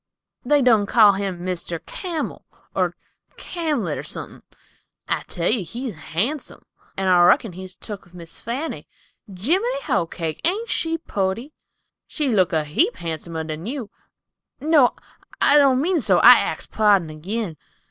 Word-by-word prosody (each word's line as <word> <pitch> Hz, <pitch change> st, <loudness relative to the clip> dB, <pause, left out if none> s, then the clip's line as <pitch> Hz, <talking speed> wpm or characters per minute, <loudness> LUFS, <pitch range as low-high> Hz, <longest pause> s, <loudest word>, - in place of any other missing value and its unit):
"They 290 Hz, -2 st, +3 dB
done 220 Hz, -5 st, +4 dB
call 210 Hz, -3 st, +6 dB
him 190 Hz, -3 st, -4 dB
Mr. 175 Hz, -2 st, -3 dB
Camel, 345 Hz, -5 st, -4 dB, 0.3 s
or -, -, 0 dB, 0.4 s
Camlet, 295 Hz, -, -2 dB
or -, -, -3 dB
suthin. -, -, -7 dB, 0.7 s
I -, -, 0 dB
tell 170 Hz, 0 st, -2 dB
you 220 Hz, -4 st, +1 dB
he's 235 Hz, +7 st, -5 dB
han'some; 215 Hz, -, -3 dB, 0.3 s
and 190 Hz, 0 st, -1 dB
I 180 Hz, -1 st, +5 dB
reckon 200 Hz, +1 st, +3 dB
he's 185 Hz, +1 st, -8 dB
tuk 205 Hz, -3 st, -8 dB
with 175 Hz, +1 st, -19 dB
Miss 170 Hz, -2 st, -10 dB
Fanny. 260 Hz, +8 st, -4 dB, 0.4 s
Jiminy 360 Hz, -, -1 dB
hoecake! 165 Hz, -2 st, -2 dB
Ain't 410 Hz, +8 st, -1 dB
she 330 Hz, 0 st, 0 dB
pooty? 225 Hz, -, -3 dB, 0.5 s
She 295 Hz, -4 st, -2 dB
looked 185 Hz, -8 st, +2 dB
a 155 Hz, -1 st, +2 dB
heap 310 Hz, -, +1 dB
han'somer 160 Hz, 0 st, -4 dB
than 160 Hz, +4 st, -6 dB
you—no, 275 Hz, +3 st, -1 dB, 0.4 s
I 295 Hz, -, +6 dB
don't 270 Hz, -3 st, +4 dB
mean 340 Hz, +4 st, +1 dB
so—I -, -, +7 dB
axes -, -, -3 dB
pardon 200 Hz, -7 st, +3 dB
agin." 175 Hz, +2 st, -4 dB
210 Hz, 140 wpm, -22 LUFS, 175-290 Hz, 0.7 s, so—I